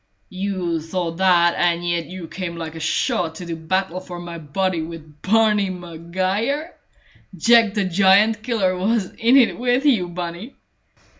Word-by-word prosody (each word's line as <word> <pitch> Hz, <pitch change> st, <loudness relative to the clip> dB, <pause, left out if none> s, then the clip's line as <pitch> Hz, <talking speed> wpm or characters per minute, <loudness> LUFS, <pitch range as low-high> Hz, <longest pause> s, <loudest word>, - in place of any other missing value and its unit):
"You 185 Hz, -4 st, -2 dB
thought 165 Hz, 0 st, -4 dB
that, 175 Hz, -2 st, +4 dB
and 175 Hz, 0 st, +1 dB
yet 170 Hz, -2 st, -1 dB
you 180 Hz, -1 st, -8 dB
came 170 Hz, +1 st, -5 dB
like 165 Hz, -2 st, -6 dB
a 165 Hz, -, -8 dB
shot 160 Hz, +1 st, -1 dB
to 175 Hz, -, -8 dB
do 170 Hz, -1 st, -4 dB
battle 185 Hz, +2 st, -2 dB
for 185 Hz, -1 st, -9 dB
my 170 Hz, -1 st, -7 dB
body 170 Hz, +3 st, -1 dB
with 160 Hz, -2 st, -10 dB
Barney 210 Hz, -1 st, +2 dB
Maguire! 185 Hz, -, -3 dB, 0.6 s
Jack 230 Hz, +3 st, +4 dB
the 205 Hz, -2 st, +1 dB
Giant 200 Hz, +4 st, +4 dB
killer 215 Hz, -6 st, 0 dB
wasn't 200 Hz, +1 st, -1 dB
in 240 Hz, +4 st, +5 dB
it 245 Hz, -3 st, +3 dB
with 250 Hz, +3 st, +1 dB
you, 225 Hz, -11 st, +3 dB
Bunny!" 175 Hz, +7 st, -6 dB
185 Hz, 155 wpm, -21 LUFS, 170-210 Hz, 0.6 s, in